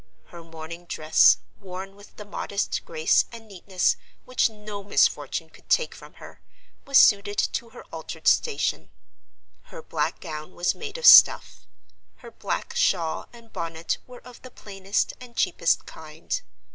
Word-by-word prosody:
Her 170 -1 -11
mourning 165 +1 -10
dress, 155 -2 +4 0.2
worn 195 0 -8
with 205 0 -17
the 210 - -10
modest 205 0 -3
grace 160 -1 +2
and 230 -1 -11
neatness 190 -2 -1 0.3
which 255 -2 +1
no 210 -2 -9
misfortune 200 - 0
could - - -21
take 485 - +2
from - - -14
her, - - -14 0.5
was 275 -1 +4
suited 205 0 +5
to 235 - -1
her - - -13
altered - - -7
station; 460 -3 +1 0.8
her 485 - -11
black - - -2
gown 155 0 -8
was 175 - 0
made 450 +1 -7
of 485 - -4
stuff; - - +7 0.6
her - - -10
black 475 - -4
shawl 175 - 0
and 230 -1 -17
bonnet 165 0 -4
were 250 -1 -13
of 250 -1 -14
the 255 - -11
plainest 195 -3 -3
and 245 -2 -13
cheapest - - +1
kind. - - -6
200 Hz, 150 wpm, -25 LUFS, 175-235 Hz, 0.8 s, stuff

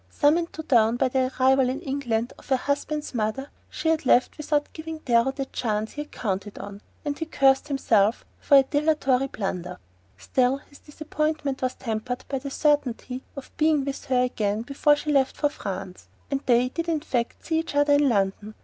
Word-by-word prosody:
Summoned 330 +3 +2
to 315 - -6
town 235 -6 +3
by 260 0 +2
the 255 0 0
arrival 265 0 +4
in 260 - -3
England 245 -4 -2
of - - -18
her 265 - +4
husband's 290 +2 -2
mother, 235 +5 -2 0.2
she 320 +1 +1
left 255 -4 +2
without 295 -1 -1
giving 320 0 -6
Darrow 240 -4 +2
the 275 0 -4
chance 215 -4 -2
he 295 - -5
had 295 - -10
counted 200 -1 -4
on, 200 0 -8 0.2
and 290 -1 -3
he 320 - -2
cursed 270 -2 +3
himself 225 -6 +2
for 285 - +5
a 270 - +7
dilatory 275 -2 +1
blunderer. 180 -6 -4 0.4
Still, 255 +1 +1
his 285 0 -18
disappointment 305 -2 -3
was 255 -1 -1
tempered 235 +2 -4
by 270 - -2
the 275 - -6
certainty 265 -3 0
of 275 - -10
being 305 -3 +2
with 275 0 -5
her 255 -1 +2
again 215 -3 -1
before 285 +3 +3
she 300 +1 -3
left 270 -2 +2
for 295 - +2
France; 190 -7 -7 0.2
and 275 -1 0
they 245 0 +4
did 335 +5 -3
in 315 -3 0
fact 245 -6 -3
see 320 -1 +1
each 325 -3 -5
other 290 0 +4
in 285 -1 +4
London. 205 0 -1
270 Hz, 190 wpm, -25 LUFS, 235-295 Hz, 0.4 s, a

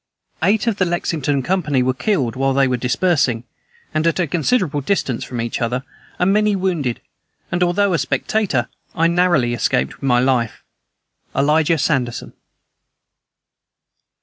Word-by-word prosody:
Eight 205 +2 +2
of 230 -4 0
the 185 - +2
Lexington 155 -5 -1
company 150 -8 +1
were 130 +1 +1
killed 130 - -1
while 135 +1 +1
they 135 -1 +4
were 130 - +1
dispersing, 125 -1 +1 0.5
and 155 +1 +1
at 165 - +1
a 180 - +2
considerable 165 - 0
distance 135 -7 -1
from 125 - -6
each 115 +1 -3
other, 125 +2 -1 0.3
and 180 +2 +2
many 210 0 +2
wounded; 170 -10 -1 0.5
and, 175 - -1
although 185 +2 +2
a 165 - +1
spectator, 185 - 0 0.3
I 165 - +2
narrowly 170 -8 +2
escaped 65 - 0
with 135 - -4
my 125 -2 +4
life. 125 -3 0 0.7
"ELIJAH 155 +4 +3
SANDERSON." 130 -5 -1
150 Hz, 145 wpm, -19 LUFS, 125-180 Hz, 0.7 s, they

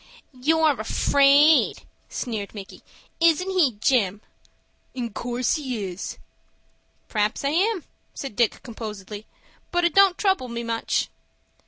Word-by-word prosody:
"You're 300 +2 +2
afraid," 280 +6 +4 0.3
sneered 220 -5 -5
Micky. 195 -2 -10 0.4
"Isn't 335 +3 +3
he, 340 -10 +3
Jim?" 205 -2 +1 0.7
"In 235 -4 -4
course 245 +4 -1
he 255 -8 -4
is." 185 +1 -6 0.9
"P'r'aps 210 +4 -1
I - - +2
am," 375 +2 +1 0.3
said 270 -7 -6
Dick, 235 -1 +1
composedly, 215 -3 -8 0.4
"but 350 0 0
it 345 - +1
don't 390 -2 +5
trouble 380 -10 +1
me 235 0 -5
much." 230 0 -1
250 Hz, 120 wpm, -24 LUFS, 215-320 Hz, 0.9 s, don't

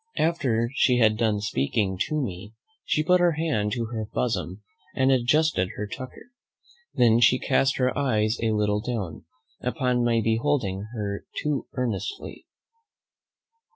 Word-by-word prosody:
After 125 -8 +1
she 125 -2 +3
had 110 -3 +4
done 110 -2 0
speaking 95 - 0
to 155 - -1
me, 105 -3 -5 0.3
she 155 - 0
put 180 +3 +4
her 175 -1 +3
hand 150 -10 -1
to 120 -1 -2
her 110 -2 -4
bosom 105 -4 -2 0.3
and 130 0 +3
adjusted 130 - +2
her 105 - -3
tucker. 130 - -9 0.6
Then 120 -2 +4
she 125 +2 +5
cast 135 +1 +1
her 130 -1 +1
eyes 110 -5 +1
a 115 - +1
little 105 -1 +1
down, 105 -10 -4 0.4
upon 125 -1 0
my 120 -1 +2
beholding 110 -4 0
her 100 -2 -4 0.2
too 150 -3 -1
earnestly. 125 - -4
120 Hz, 140 wpm, -25 LUFS, 105-135 Hz, 0.6 s, she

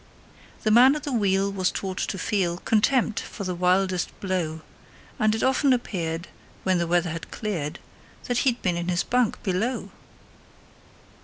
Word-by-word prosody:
The 215 - +2
man 255 +5 +7
at 300 - -5
the 290 - -3
wheel 200 -3 +2
was 185 -2 +1
taught 190 -1 -4
to - - -2
feel 180 -3 0
Contempt 225 +3 +2
for - - -7
the 185 -1 -2
wildest 185 +1 +1
blow, 175 -5 -2 0.6
And 215 0 +3
it 225 - -2
often 265 +1 +3
appeared, 170 -8 -3 0.4
when 185 -2 +2
the 170 - 0
weather 175 0 +1
had 165 0 -6
cleared, 170 -9 -3 0.5
That 245 -1 0
he'd 250 -3 +1
been 180 -3 +1
in 175 0 -3
his 180 -1 +1
bunk 250 -3 0
below. 215 +7 -1
195 Hz, 160 wpm, -25 LUFS, 175-225 Hz, 0.6 s, man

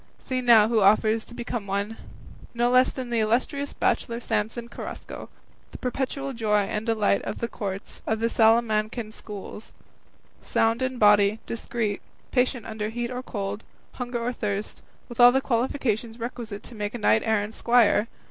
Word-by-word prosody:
See 255 -1 -3
now 230 -4 +6
who 225 -1 +2
offers 215 +2 +4
to 240 - -10
become 235 -3 -4
one; 200 +3 -2 0.6
no 240 +1 +2
less 255 +1 +5
than 255 -2 -6
the 235 - +1
illustrious 255 +6 0
bachelor 235 0 0
Samson 225 +1 -2
Carrasco, - - -8 0.4
the - - -10
perpetual 270 +2 -3
joy 215 -3 +2
and 210 +3 -3
delight 215 -3 +2
of - - -5
the 235 - -2
courts 195 -4 -6
of 220 0 0
the 230 - 0
Salamancan 220 -1 +2
schools, 210 0 -9 0.7
sound 225 +2 +1
in 260 0 -1
body, 205 0 +5
discreet, 225 -2 -3 0.3
patient 250 -3 +1
under 215 -1 -4
heat 240 +2 -3
or 250 0 -4
cold, 205 -3 -4 0.3
hunger 245 -1 -4
or 245 +1 -1
thirst, 205 -2 -4 0.3
with 240 - -11
all 245 0 +9
the 265 - +2
qualifications 235 -3 -1
requisite 230 -3 -6
to - - -9
make 210 0 -4
a - - -2
knight 110 - +3
errant's 215 0 0
squire! 235 -2 +4
225 Hz, 165 wpm, -25 LUFS, 210-240 Hz, 0.7 s, all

